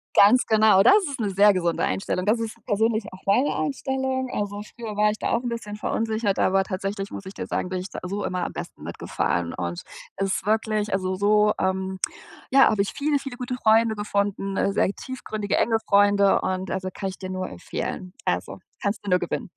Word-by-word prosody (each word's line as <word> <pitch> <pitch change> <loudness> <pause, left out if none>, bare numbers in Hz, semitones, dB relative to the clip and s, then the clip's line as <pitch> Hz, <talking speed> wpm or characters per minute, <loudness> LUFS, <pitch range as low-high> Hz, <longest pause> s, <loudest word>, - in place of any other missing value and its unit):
Ganz 220 +6 +6
genau. 215 -3 +5
Das 240 - +7 0.2
ist 275 -2 -6
'ne 210 -3 -1
sehr 200 +2 +6
gesunde 175 -3 0
Einstellung. 185 -1 -1
Das 225 +3 +3
ist 225 -1 -4
persönlich 220 0 +1
auch 185 - -12
meine 245 +9 +2
Einstellung. 265 -1 -2
Also 205 0 -3
früher 225 -3 -6
war 210 +1 +3
ich 210 - -2
da - - -2
auch - - +1
'n 245 - -3
bisschen 230 -3 -5
verunsichert, 220 -1 -1
aber 195 0 +3
tatsächlich, 195 +1 -4
muss 200 - -8
ich 190 - -8
dir - - -6
sagen, 180 - -2
bin 185 0 -2
ich 185 +2 -6
da - - -6
so 200 +3 -3
immer 180 -1 -2
am - - -5
besten - - -8
mitgefahren 85 -1 -2
und 85 -1 -4 0.4
es 195 0 0
ist - - -4
wirklich 215 0 0
also, 185 -1 0
so, 210 +2 +3
ähm, 190 0 -1 0.5
ja, 270 0 +7
habe 210 - +1
ich 195 - -5
viele, 290 0 +1
viele 270 -3 -7
gute 250 0 -3
Freunde 225 -1 +3
gefunden, 200 -1 -1
äh, - - +2
sehr 195 - +2
tiefgründige, 215 -6 -4
enge 225 0 +3
Freunde. 200 -1 +4
Und 185 0 -2
also 185 0 -2
kann 195 - -3
ich 190 - -8
dir 185 - -7
nur 185 0 -3
empfehlen. 180 - -5
Also - - -2 0.2
kannst 205 +1 -2
du - - -3
nur 180 0 +4
gewinnen. - - -3
205 Hz, 210 wpm, -24 LUFS, 190-220 Hz, 0.5 s, Das